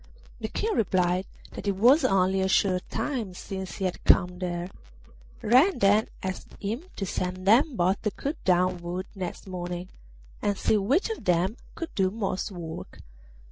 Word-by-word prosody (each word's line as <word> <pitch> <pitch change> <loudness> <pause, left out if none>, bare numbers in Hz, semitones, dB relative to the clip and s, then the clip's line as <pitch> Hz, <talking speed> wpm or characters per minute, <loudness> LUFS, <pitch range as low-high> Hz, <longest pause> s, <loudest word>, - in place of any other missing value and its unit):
The - - -3
King 445 0 -1
replied 185 -2 +1 0.2
that - - -7
it 200 - +1
was 250 - +5
only 190 0 +3
a 190 - +2
short 185 -1 +2
time 230 -11 -3
since 190 0 -6
he 195 - -2
had 185 - -3
come 180 0 +4
there. 175 0 -3 0.7
Red 260 - +5
then 205 +1 +4 0.2
asked 190 -1 -5
him 225 - -3
to 195 - -3
send 185 0 -3
them 250 +6 +5
both 185 +1 +1
to 210 - 0
cut 285 +9 -5
down 180 0 +3
wood 175 +2 -4
next 185 -3 -5
morning, 180 -1 -5 0.5
and 205 -1 0
see 215 - +2
which 275 - +1
of 445 - -6
them 180 +4 +2 0.2
could 330 - -6
do 190 -2 +2
most 195 -2 -2
work. 170 -3 -8
190 Hz, 170 wpm, -27 LUFS, 180-215 Hz, 0.7 s, was